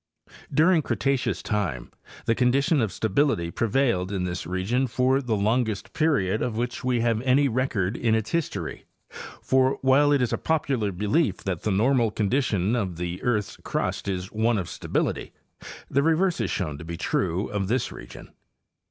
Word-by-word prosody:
During 160 +4 +4
Cretaceous 135 -2 -1
time 90 - -2 0.3
the 115 - +3
condition 135 +5 +2
of 110 -4 0
stability 110 - 0
prevailed 115 -5 +1
in 95 -3 -1
this 90 -2 -4
region 100 +9 0
for 130 +3 +2
the 120 -4 -1
longest 110 0 0
period 110 -11 +1
of 115 -3 -2
which 120 +1 -3
we 125 -2 +1
have 115 -1 +1
any 135 +3 +3
record 115 -5 -1
in 115 -2 +1
its 110 -1 -2
history; 170 -3 -3 0.6
for, 130 0 +2
while 140 +2 +5
it 145 - +4
is 125 -2 0
a - - -1
popular 135 -10 0
belief 105 - +1
that 95 -3 -3
the - - -1
normal 115 +4 +3
condition 105 -1 0
of 95 -8 -2
the 90 0 -4
earth's 110 -5 -1
crust - - -3
is 95 -1 -3
one 110 +1 +1
of 90 -4 -3
stability, - - -2 0.5
the 140 - +1
re 160 +2 +3
verse 180 +1 +1
is. - - -1
shown 75 -7 -3
to - - -8
be 85 +1 -6
true 95 0 -1
of 100 -2 -2
this 125 +5 0
region. - - -11
115 Hz, 170 wpm, -25 LUFS, 95-135 Hz, 0.6 s, while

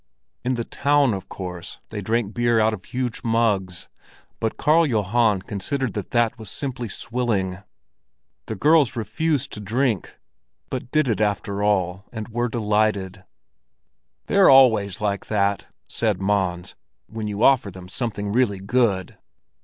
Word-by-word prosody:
In 125 +1 0
the 120 - -2
town, 140 -1 +2
of 95 - -6
course, 90 -1 -7
they 105 -2 -5
drank 110 +1 -1
beer 120 -1 +2
out 110 0 +3
of 95 -4 -7
huge 125 -2 -3
mugs, 105 -6 0 0.5
but 110 - -2
Karl 160 +3 +4
Johan 110 - +1
considered 115 +5 -3
that 105 -3 -5
that 120 0 +1
was 110 -4 -8
simply 125 -3 -4
swilling. 110 -5 -2 0.9
The 110 - -3
girls 150 +2 +4
refused 140 +5 -1
to - - -5
drink, 110 - -1 0.6
but 125 -1 -4
did 155 0 +2
it 110 -3 0
after 100 -1 -1
all, 95 -2 0
and 110 -3 -6
were 120 +1 -1
delighted. 105 -4 0 1.0
"They're 200 -1 +5
always 110 -6 +5
like 100 -2 -1
that," 100 -2 0 0.2
said - - -1
Mons, 95 -3 -1 0.3
"when 110 -1 -5
you 105 +2 -2
offer 130 -7 +4
them 90 -1 -11
something 100 0 -3
really 110 -3 +2
good." 100 -2 0
110 Hz, 145 wpm, -23 LUFS, 100-120 Hz, 1.0 s, They're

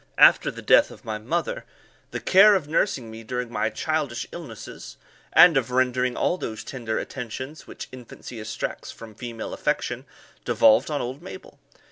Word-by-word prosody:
After - - +6
the - - -8
death - - +5
of - - -14
my 110 -1 -3
mother, 170 - -2 0.5
the - - -4
care 200 +2 +7
of 170 -7 -1
nursing 140 - 0
me 110 +1 -9
during 125 +1 -4
my 110 - 0
childish 140 +2 -2
illnesses, 115 - -9 0.3
and 175 -3 +8
of 125 -3 0
rendering 125 0 +1
all 180 - +1
those 110 -1 -5
tender 115 -4 -4
attentions 130 +4 -6
which - - -8
infancy 125 -1 -10
exacts 110 +1 -5
from 115 -1 -10
female 115 0 -6
affection, - - -2 0.4
devolved 110 +5 +4
on 150 -2 -1
old 130 +5 -5
Mabel. 480 - -11
125 Hz, 160 wpm, -25 LUFS, 115-155 Hz, 0.5 s, and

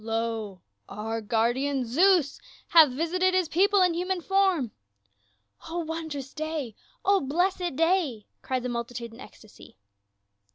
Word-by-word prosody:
Lo, 225 -4 -3 0.3
our 220 +3 -4
guardian 245 +5 0
Zeus 325 +4 +3 0.3
hath 320 -4 +7
visited 355 +7 0
his 370 -3 +2
people 390 +4 +3
in 360 -2 +2
human 365 +2 -1
form 375 - +1 0.5
!" 100 - -20
"O 335 - -4
wondrous 315 -5 -5
day! 310 -6 -4 0.3
O 395 0 +4
blessed 355 +3 -1
day!" 330 - +1 0.2
cried 255 -1 -2
the - - -2
multitude 235 -1 -5
in 230 - -14
ecstacy. 215 -4 -15
285 Hz, 130 wpm, -27 LUFS, 230-350 Hz, 0.5 s, hath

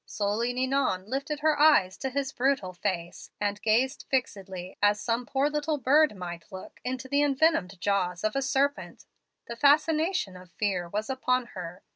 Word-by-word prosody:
"Slowly 210 +4 -1
Ninon 255 -7 0
lifted 275 +4 -3
her 305 -1 +2
eyes 290 -12 +5
to 265 - -3
his 275 +1 -2
brutal 255 -8 0
face, 175 -2 -4
and 205 0 -2
gazed 245 +6 +1
fixedly 190 -8 -3
as 205 0 +4
some 235 +2 -2
poor 275 +1 +1
little 300 +1 -1
bird 290 +1 +4
might 175 0 -8
look 190 -1 -10
into 260 +1 -4
the 285 +2 +2
envenomed 275 - +2
jaws 185 -2 0
of 215 0 0
a 275 - +1
serpent. 275 +1 -1 0.4
The 235 - -6
fascination 305 - +2
of 180 0 -13
fear 185 -5 -1
was 210 +4 -3
upon 255 -2 0
her. 180 -1 -8
245 Hz, 165 wpm, -28 LUFS, 190-280 Hz, 0.4 s, eyes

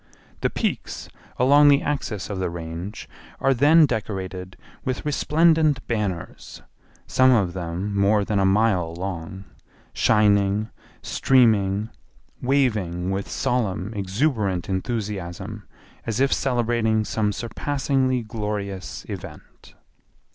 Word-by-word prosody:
The - - +1
peaks - - -3 0.3
along 145 +4 +6
the 140 -1 +5
axis 125 -9 -3
of 100 - -3
the 95 - -1
Range 85 +4 -7 0.3
are 135 0 +3
then 150 +5 +6
decorated 95 -6 -4 0.3
with 130 +2 -3
resplendent 155 0 +2
banners, 100 -7 -4 0.4
some 130 0 +4
of 100 -8 +2
them 90 +3 -4
more 100 +1 +3
than 105 -1 0
a - - +3
mile 95 -5 +2
long, 95 0 -5 0.5
shining, 105 -1 +2 0.3
streaming, 110 -5 +2 0.5
waving 105 -10 0
with 95 +1 -3
solemn 105 -4 -1
exuberant 100 - -1
enthusiasm 100 -1 -4 0.4
as 115 0 -1
if 135 +1 +3
celebrating 115 -4 +1
some 105 -1 0
surpassingly 130 +2 -1
glorious 105 -5 -5
event. - - -10
105 Hz, 105 wpm, -23 LUFS, 95-125 Hz, 0.5 s, along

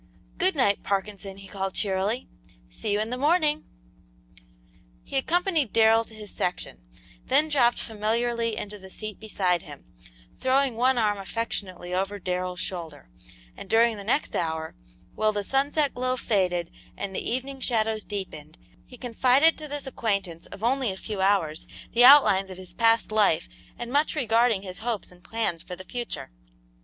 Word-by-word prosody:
"Good 375 -1 +3
night, 205 -8 +2
Parkinson," 195 0 -3
he 195 0 -11
called, 195 -1 -4
cheerily; 200 +4 0 0.4
"see - - -4
you 205 - +2
in 220 +2 -2
the 250 - -3
morning!" 305 0 +2 1.4
He - - -8
accompanied 320 - +1
Darrell 225 0 +5
to 220 - -13
his 210 -2 -8
section; 175 - -3 0.5
then 310 +1 +3
dropped 245 -5 +3
familiarly 230 +1 -1
into 210 0 -6
the 190 0 -12
seat 215 +1 -7
beside 185 -5 0
him, - - -12 0.5
throwing 260 -1 +2
one 255 +2 +3
arm 210 -3 +2
affectionately 190 -4 -3
over 195 +2 -1
Darrell's 180 -1 -3
shoulder, 165 - -6 0.4
and 195 - -10
during 230 0 +4
the 200 - -8
next 235 +8 0
hour, 160 -1 -2 0.4
while 215 0 +2
the 205 -1 -2
sunset 280 +5 +1
glow 255 +1 -1
faded 180 -7 0 0.3
and 195 -1 -4
the - - 0
evening 265 +3 -3
shadows 220 -4 +1
deepened, 160 -6 -6 0.3
he 250 - -12
confided 255 +6 +3
to 305 - -5
this 290 0 -4
acquaintance 200 -9 -2
of 200 - -11
only 255 0 +2
a 190 - -7
few 205 -1 -5
hours 190 -6 +1 0.3
the 240 - +5
outlines 245 -8 +7
of 185 - -8
his 185 -1 -10
past 230 -1 +3
life 200 -6 +3 0.3
and 240 0 -6
much 295 +3 +2
regarding 230 -6 +2
his 185 -2 -6
hopes 225 -4 -3
and 180 0 -18
plans 220 -7 -1
for 180 - -7
the 185 +1 -11
future. 240 - -6
215 Hz, 165 wpm, -26 LUFS, 190-250 Hz, 1.4 s, outlines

